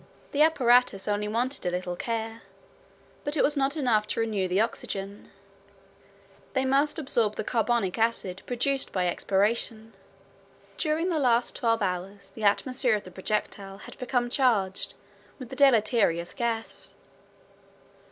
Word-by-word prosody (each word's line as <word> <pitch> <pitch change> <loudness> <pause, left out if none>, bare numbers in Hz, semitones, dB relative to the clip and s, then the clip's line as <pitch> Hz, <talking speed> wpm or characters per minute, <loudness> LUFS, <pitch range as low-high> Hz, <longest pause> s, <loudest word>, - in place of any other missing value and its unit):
The 290 - +1
apparatus 250 -9 +4
only 210 0 0
wanted 245 +6 -1
a - - 0
little 180 0 -3
care. 225 +2 -4 0.8
But 290 +2 -2
it - - +3
was 295 - +3
not 280 +2 0
enough 225 -7 +2
to - - -2
renew 215 -4 0
the 180 +2 +1
oxygen; 200 -2 -3 1.2
they 265 -1 +1
must 275 +4 +2
absorb 235 -8 0
the - - -3
carbonic 225 -4 0
acid 200 -5 0
produced 265 +3 0
by 185 -2 0
expiration. 215 +4 0 0.8
During 320 +3 0
the 330 -3 0
last 245 -3 +2
twelve 230 -2 +1
hours 195 +2 -4
the 220 - -11
atmosphere 245 +3 +2
of 210 - -4
the 185 - -11
projectile 195 0 -3
had - - -11
become 245 -1 -1
charged 220 -9 +1 0.4
with 255 -3 -9
this 265 - -8
deleterious 215 - +3
gas. 230 -2 -4
225 Hz, 140 wpm, -27 LUFS, 200-255 Hz, 1.2 s, apparatus